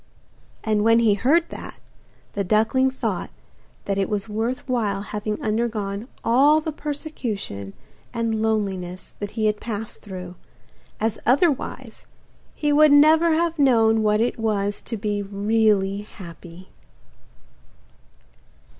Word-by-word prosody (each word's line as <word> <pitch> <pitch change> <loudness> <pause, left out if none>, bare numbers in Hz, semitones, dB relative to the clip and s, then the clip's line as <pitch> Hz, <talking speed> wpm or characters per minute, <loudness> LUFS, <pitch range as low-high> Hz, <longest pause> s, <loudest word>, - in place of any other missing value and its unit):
And 215 -1 +1
when 230 +1 +5
he 230 -3 +4
heard 295 +11 +2
that, - - -9 0.5
the 200 - -1
duckling 225 +7 +2
thought 265 - -3 0.6
that 200 0 -1
it 195 - 0
was 210 0 -2
worth 225 +5 -3
while 210 -6 -1
having 210 0 -4
undergone 215 -1 -2 0.2
all 280 +6 +5
the 315 0 -4
persecution 245 - -5 0.4
and 230 -2 -1
loneliness 190 -5 -2
that 205 - -4
he 220 - +1
had 210 -1 +1
passed 220 -1 -5
through, 185 -3 -8 0.7
as 220 0 -1
otherwise 280 +4 0 0.5
he 295 -1 0
would 305 0 +6
never 315 +3 +6
have 335 -1 0
known 225 -5 +4
what 210 0 +2
it 235 0 0
was 205 -2 -1
to 230 - -4
be 205 -1 -2
really 200 0 +1
happy. 175 -3 -12
220 Hz, 125 wpm, -23 LUFS, 200-250 Hz, 0.7 s, would